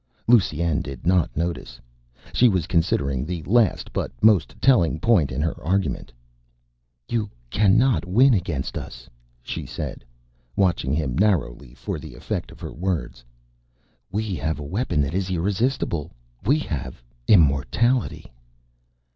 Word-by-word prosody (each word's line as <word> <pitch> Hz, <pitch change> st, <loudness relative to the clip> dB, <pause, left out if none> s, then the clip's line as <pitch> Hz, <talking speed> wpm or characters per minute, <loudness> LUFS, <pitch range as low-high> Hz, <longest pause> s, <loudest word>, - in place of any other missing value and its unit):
Lusine 85 Hz, -8 st, +3 dB
did 70 Hz, -2 st, -8 dB
not 90 Hz, -2 st, +3 dB
notice. 85 Hz, +1 st, -3 dB, 0.5 s
She 125 Hz, -, +5 dB
was 90 Hz, -6 st, 0 dB
considering 70 Hz, -7 st, 0 dB
the 85 Hz, +1 st, -4 dB
last 110 Hz, +5 st, +2 dB
but -, -, -2 dB
most 105 Hz, -7 st, +4 dB
telling 90 Hz, -12 st, +3 dB
point 90 Hz, -6 st, +3 dB
in 65 Hz, +2 st, -2 dB
her 80 Hz, -, -3 dB
argument 95 Hz, -5 st, -1 dB, 1.0 s
"You 110 Hz, -3 st, -1 dB, 0.2 s
cannot 110 Hz, +5 st, +3 dB
win 125 Hz, +8 st, +5 dB
against 85 Hz, -, -2 dB
us," -, -, -10 dB, 0.4 s
she -, -, -5 dB
said, -, -, -6 dB, 0.5 s
watching 90 Hz, -9 st, +1 dB
him 70 Hz, -4 st, -1 dB
narrowly 70 Hz, -, 0 dB
for -, -, -5 dB
the -, -, -10 dB
effect -, -, -4 dB
of -, -, -14 dB
her -, -, -6 dB
words. 85 Hz, -8 st, -3 dB, 0.9 s
"We 105 Hz, 0 st, -2 dB
have 80 Hz, 0 st, -2 dB
a 75 Hz, -, -6 dB
weapon 90 Hz, -, -1 dB
that 70 Hz, +2 st, -2 dB
is 95 Hz, 0 st, -1 dB
irresistible. 95 Hz, -, -1 dB, 0.3 s
We 140 Hz, +8 st, +3 dB
have 65 Hz, -, -5 dB, 0.2 s
immortality." 100 Hz, -, +3 dB
90 Hz, 130 wpm, -23 LUFS, 75-105 Hz, 1.0 s, She